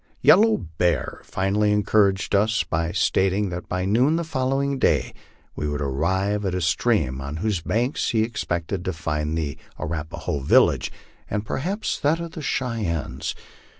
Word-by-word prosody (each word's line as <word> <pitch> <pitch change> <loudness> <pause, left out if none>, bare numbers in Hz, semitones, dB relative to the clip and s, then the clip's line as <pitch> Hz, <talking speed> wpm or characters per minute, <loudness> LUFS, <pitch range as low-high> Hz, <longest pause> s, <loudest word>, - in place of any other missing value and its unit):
Yellow 220 +6 +6 0.2
Bear 85 -4 0
finally 100 +2 +1
encouraged 100 -1 +2
us 105 +3 +3
by 85 +1 -1
stating 95 +2 +1
that 90 0 -6
by 90 0 -1
noon 125 +10 +3
the 170 - 0
following 135 -2 -1
day 70 - +2 0.4
we 75 - -2
would 75 0 -2
arrive 95 +9 0
at 95 -2 -1
a 90 - -1
stream, 80 - +1
on 70 +2 -5
whose 95 +1 -1
banks 120 - 0
he 110 -2 +2
expected 90 -5 -3
to 95 - -1
find 75 -1 -2
the 75 -4 -3 0.2
Ar 75 - -4
apaho 75 -2 -3
village, - - +4 0.4
and 105 +1 -2
perhaps 190 - -2
that 155 +3 +2
of 170 -1 -5
the 160 - -7
Cheyennes. 85 - -2
95 Hz, 155 wpm, -24 LUFS, 80-115 Hz, 0.4 s, Yellow